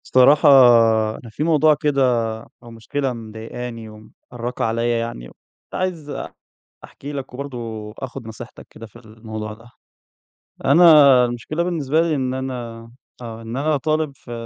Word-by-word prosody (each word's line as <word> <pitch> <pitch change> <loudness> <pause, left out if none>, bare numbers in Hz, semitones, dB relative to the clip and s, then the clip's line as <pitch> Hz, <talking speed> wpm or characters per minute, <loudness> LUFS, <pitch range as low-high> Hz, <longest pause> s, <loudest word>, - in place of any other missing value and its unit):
الصراحة 140 +4 +5 0.7
أنا 115 - -12
في 110 - -4
موضوع 155 -1 +4
كده 145 -2 0 0.6
أو 120 - -12
مشكلة 130 +4 -3
مضايقاني 115 +1 -8
ومأرّقة 120 +3 -7
عليّا 115 +1 0
يعني 115 - -6
وكنت - - -29
عايز 175 -5 -3 0.8
أحكي 145 +2 -9
لك 135 -3 -7
وبرضه 140 -1 -6 0.4
آخُد 130 -2 -7
نصيحتك 110 - -11
كده 115 - -11
في 110 - -20
الموضوع 110 -1 -8
ده. 115 +3 -15 1.0
أنا 150 -7 +7
المشكلة 120 +7 -3
بالنسبة 160 -3 0
لي 165 -2 0
إن 130 -2 -2
أنا 125 -3 -5 0.4
آه. 115 -1 -8
إن 115 +2 -6
أنا 150 +2 +1
طالب 155 +1 -1
في 120 - -14
125 Hz, 135 wpm, -20 LUFS, 115-145 Hz, 1.0 s, أنا